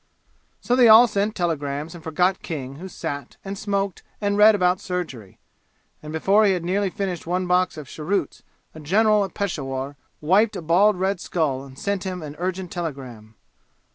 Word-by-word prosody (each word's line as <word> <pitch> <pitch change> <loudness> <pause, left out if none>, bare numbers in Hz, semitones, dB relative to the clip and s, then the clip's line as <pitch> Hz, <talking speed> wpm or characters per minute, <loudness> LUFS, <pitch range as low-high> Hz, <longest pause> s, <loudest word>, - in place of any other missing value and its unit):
So 245 - +1
they 250 -2 +6
all 220 +3 +9
sent 210 0 -1
telegrams 150 -3 -2
and 170 -2 -11
forgot 180 +4 +1
King 135 -5 -6
who 185 +4 -8
sat 145 -6 -6
and 195 +1 -4
smoked 200 -2 -2 0.2
and 205 -1 0
read 210 +1 +7
about 180 -1 +2
surgery; 155 - -5 0.6
and 150 - -8
before 195 +7 +3
he 200 -2 +4
had 175 -2 -3
nearly 195 +2 0
finished 185 -3 -4
one 180 +1 0
box 180 -1 +1
of 150 -3 -8
cheroots 165 +2 -3 0.3
a 155 - -10
general 210 +7 +3
at 195 - -6
Peshawur 140 -7 -3 0.2
wiped 195 +8 +3
a - - -4
bald 185 +4 +3
red 190 0 0
skull 140 -6 -1
and 135 -1 -13
sent 200 +2 -2
him 185 -3 -5
an 150 -1 -8
urgent 185 0 -3
telegram. 130 -10 -6
180 Hz, 175 wpm, -23 LUFS, 150-200 Hz, 0.6 s, all